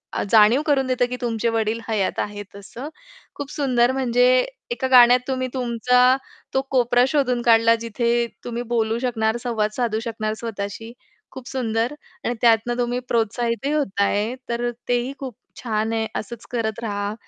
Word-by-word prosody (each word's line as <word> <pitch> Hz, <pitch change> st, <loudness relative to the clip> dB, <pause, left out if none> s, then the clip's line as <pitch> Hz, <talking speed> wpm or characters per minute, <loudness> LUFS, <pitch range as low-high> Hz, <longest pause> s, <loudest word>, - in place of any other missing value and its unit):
आ -, -, 0 dB
जाणीव 225 Hz, +5 st, +6 dB
करून 270 Hz, -3 st, +2 dB
देतं 250 Hz, -1 st, +1 dB
की 250 Hz, -, -3 dB
तुमचे 230 Hz, -1 st, -1 dB
वडील 225 Hz, 0 st, -1 dB
हयात 210 Hz, -4 st, -1 dB
आहेत 205 Hz, -1 st, -5 dB
असं. 235 Hz, +8 st, -8 dB, 0.5 s
खूप 285 Hz, 0 st, -6 dB
सुंदर 255 Hz, -4 st, +2 dB
म्हणजे 250 Hz, -2 st, +1 dB, 0.5 s
एका 265 Hz, -, -1 dB
गाण्यात 245 Hz, -1 st, +7 dB
तुम्ही 255 Hz, -1 st, -1 dB
तुमचा 250 Hz, 0 st, +1 dB, 0.5 s
तो 265 Hz, -, +2 dB
कोपरा 245 Hz, -1 st, +3 dB
शोधून 255 Hz, -4 st, +1 dB
काढला. 230 Hz, -1 st, +5 dB
जिथे 235 Hz, +1 st, 0 dB, 0.2 s
तुम्ही 240 Hz, 0 st, -4 dB
बोलू 225 Hz, 0 st, +1 dB
शकणार, 225 Hz, -2 st, 0 dB
संवाद 215 Hz, -3 st, -1 dB
साधू 230 Hz, -3 st, 0 dB
शकणार 215 Hz, -2 st, -3 dB
स्वतःशी. 225 Hz, 0 st, -5 dB, 0.4 s
खूप 260 Hz, -1 st, -10 dB
सुंदर! 235 Hz, 0 st, -1 dB, 0.3 s
आणि 240 Hz, -, 0 dB
त्यातनं 235 Hz, +1 st, +3 dB
तुम्ही 245 Hz, 0 st, -1 dB
प्रोत्साहितही 235 Hz, +4 st, 0 dB
होतं 210 Hz, -10 st, 0 dB
आहे. 210 Hz, +5 st, 0 dB
तर 240 Hz, +1 st, -1 dB, 0.2 s
तेही 245 Hz, +2 st, 0 dB
खूप 260 Hz, -5 st, -6 dB, 0.3 s
छान 220 Hz, -1 st, -1 dB
आहे, 220 Hz, -1 st, -1 dB
असंच 230 Hz, +2 st, -6 dB
करत 225 Hz, -2 st, -2 dB
रहा. 205 Hz, -1 st, -2 dB
235 Hz, 155 wpm, -22 LUFS, 220-250 Hz, 0.5 s, गाण्यात